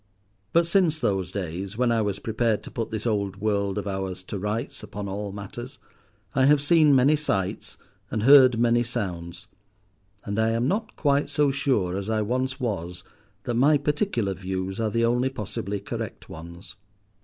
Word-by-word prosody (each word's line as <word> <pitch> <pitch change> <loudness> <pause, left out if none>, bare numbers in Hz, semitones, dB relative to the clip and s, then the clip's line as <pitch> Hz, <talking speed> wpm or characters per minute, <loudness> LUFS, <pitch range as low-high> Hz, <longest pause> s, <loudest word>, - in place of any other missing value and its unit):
But 170 0 +4
since 170 -3 +3
those 95 - -1
days 95 +2 -5
when 125 -1 +2
I 115 -1 +2
was 100 -2 -1
prepared 110 +1 0
to - - -10
put 115 -2 -3
this 110 0 -4
old 100 -4 0
world 100 -1 -1
of 105 - -3
ours 95 -1 -4
to 100 +1 -5
rights 105 +4 -3
upon 100 +1 -6
all 100 +1 -4
matters, 120 +7 -8 0.6
I 135 -2 +3
have 145 +1 +5
seen 150 0 +5
many 135 +4 +5
sights 100 -11 -2 0.3
and 110 - -2
heard 130 -2 +7
many 120 0 +3
sounds, 90 -8 -4 0.8
and 100 +2 -2
I 110 0 +2
am 115 +2 +1
not 210 +6 -2
quite 145 -1 +1
so 145 -2 +2
sure 125 -10 0
as 100 +2 -4
I 110 -1 +1
once 130 +4 -2
was 90 -7 -3 0.4
that 120 - -2
my 140 +6 +4
particular 145 - 0
views 95 +1 -4
are 110 -1 +1
the 115 +2 +1
only 125 +2 +2
possibly 105 -4 -4
correct 100 - -6
ones. 85 +2 -10
110 Hz, 175 wpm, -25 LUFS, 100-130 Hz, 0.8 s, heard